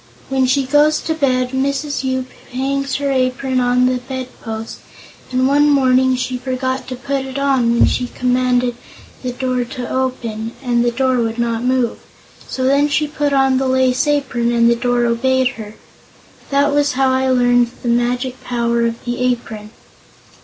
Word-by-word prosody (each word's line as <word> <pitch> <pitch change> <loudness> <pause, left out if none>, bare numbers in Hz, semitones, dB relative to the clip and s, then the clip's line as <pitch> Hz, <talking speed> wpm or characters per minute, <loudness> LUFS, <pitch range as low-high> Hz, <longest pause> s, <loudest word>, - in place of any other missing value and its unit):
When 265 -1 +1
she 270 +2 +2
goes 295 +3 +3
to 320 - -2
bed, 255 -5 0
Mrs. 280 +2 -1
Yoop 260 -1 -2 0.2
hangs 275 +2 -2
her 280 -1 -1
apron 255 0 0
on 250 0 +2
the 255 0 +1
bedpost, 245 -3 -7 0.5
and 255 +1 +2
one 290 +2 +4
morning 260 -2 +3
she 255 0 -3
forgot 260 0 -3
to 255 - -5
put 275 +1 -3
it 265 0 -6
on 270 -4 +2
when 235 - +4
she 250 - -1
commanded 250 -1 0 0.5
the 255 - -3
door 255 0 -1
to 250 0 -6
open, 235 -4 -3
and 240 -2 +1
the 240 - +2
door 260 +1 +1
would 225 0 -1
not 235 -1 -1
move. 255 -2 0 0.5
So 260 - -4
then 280 +2 +3
she 300 +1 +1
put 290 -1 -1
on 270 -1 +3
the 265 - 0
lace 260 +1 +2
apron 255 -5 0
and 235 -1 +3
the - - +3
door 245 0 0
obeyed 260 +2 +2
her. 215 -3 -9 0.7
That 285 +1 +2
was 290 0 +2
how 265 0 +2
I 260 0 +1
learned 245 -1 +3
the 240 - -1
magic 245 +2 -1
power 235 -1 0
of 230 +1 -6
the 240 0 -3
apron." 235 -4 -2
255 Hz, 175 wpm, -18 LUFS, 245-270 Hz, 0.7 s, one